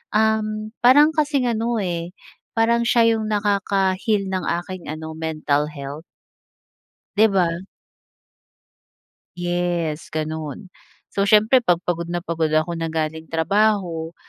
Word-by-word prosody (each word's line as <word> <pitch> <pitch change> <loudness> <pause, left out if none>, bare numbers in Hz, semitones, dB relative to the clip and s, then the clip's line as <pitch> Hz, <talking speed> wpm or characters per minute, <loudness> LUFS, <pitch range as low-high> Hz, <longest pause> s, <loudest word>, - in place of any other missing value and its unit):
um, 215 0 +1
parang 290 +5 +7
kasing 290 -4 +1
ano 230 +1 -1
eh, 175 -3 -3 0.4
parang 235 +1 +3
siya 230 -1 +4
yung 220 -1 -3
nakaka-heal 200 0 +1
ng 185 -1 -2 0.2
aking 185 -1 -8
ano, 160 0 -6
mental 155 -2 -1
health. 145 +2 -7 1.1
Di 215 - +6
ba? 175 -4 +1 1.8
Yes, 175 -3 -2
ganun. 155 +4 -5 0.4
So 200 - +1
siyempre 215 +5 +5
pag 175 -6 +1
pagod 170 -1 -1
na 175 0 -2
pagod 165 -2 -1
ako 155 +2 +1
na 165 - -2
galing 160 0 -3
trabaho, 175 -2 +1
185 Hz, 120 wpm, -22 LUFS, 160-215 Hz, 1.8 s, parang